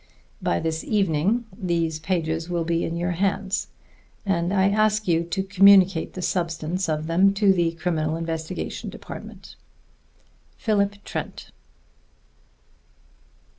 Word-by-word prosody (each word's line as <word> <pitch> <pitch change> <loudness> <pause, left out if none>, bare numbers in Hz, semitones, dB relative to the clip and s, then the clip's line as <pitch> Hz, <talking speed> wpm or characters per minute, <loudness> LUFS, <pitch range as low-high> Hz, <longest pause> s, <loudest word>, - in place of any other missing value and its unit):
By 85 - 0
this 160 0 -2
evening 200 +3 +1
these 170 -4 -1
pages 165 -1 -2
will 170 -1 0
be 170 0 0
in 165 - -3
your 175 +1 -1
hands, 195 +2 -1 0.6
and 175 -2 0
I 195 -1 +3
ask 215 0 +2
you 165 -1 +2
to 170 +3 -2
communicate 195 -2 +5
the 185 - -5
substance 170 0 -1
of 155 0 -1
them 185 +5 +3
to 200 -1 +4
the 170 -2 +1
Criminal 160 -2 -1
Investigation 165 +1 -4
Department. - - -10 1.0
PHILIP 205 -2 0
TRENT. - - -6
175 Hz, 120 wpm, -24 LUFS, 165-195 Hz, 1.0 s, communicate